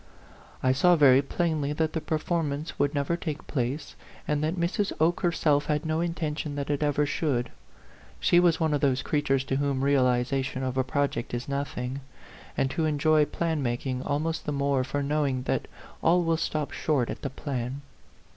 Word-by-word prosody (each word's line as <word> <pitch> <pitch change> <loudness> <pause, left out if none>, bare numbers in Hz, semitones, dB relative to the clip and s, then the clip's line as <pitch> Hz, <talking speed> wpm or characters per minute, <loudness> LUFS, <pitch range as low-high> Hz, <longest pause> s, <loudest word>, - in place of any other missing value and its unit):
I 130 - +4
saw 175 +7 +5
very 135 -4 +6
plainly 150 -1 -1
that 155 +1 -1
the 160 - -1
performance 155 -1 -2
would 145 +1 +1
never 140 +4 0
take 160 -3 -5
place, 130 +2 -3 0.3
and 150 0 0
that 160 +3 0
Mrs. 185 +4 0
Oke 165 +2 +3
herself 155 -4 +2
had 150 0 0
no 160 0 0
intention 160 -3 -2
that 145 0 -2
it 145 - -1
ever 150 0 +2
should. 135 -5 -1 0.7
She 175 - +4
was 170 -2 +3
one 160 -2 +1
of 145 - 0
those 135 -2 +2
creatures 140 -3 +1
to 135 0 -1
whom 140 -1 0
re 140 +1 +3
alization 130 0 +1
of 130 -1 -2
a 130 - +2
project 130 -2 -1
is 120 0 -4
nothing, 140 -1 -3 0.6
and 135 0 +1
who 160 - 0
enjoy 155 0 +3
plan 160 -1 -1
making 125 +1 -2
almost 155 +4 -2
the - - 0
more 140 -2 +1
for 140 +2 -2
knowing 140 -3 0
that - - -1 0.3
all 175 +2 +4
will 165 0 +2
stop 155 -2 -2
short 140 -6 0
at - - -7
the 140 - -3
plan. 135 -1 -4
145 Hz, 185 wpm, -27 LUFS, 135-155 Hz, 0.7 s, very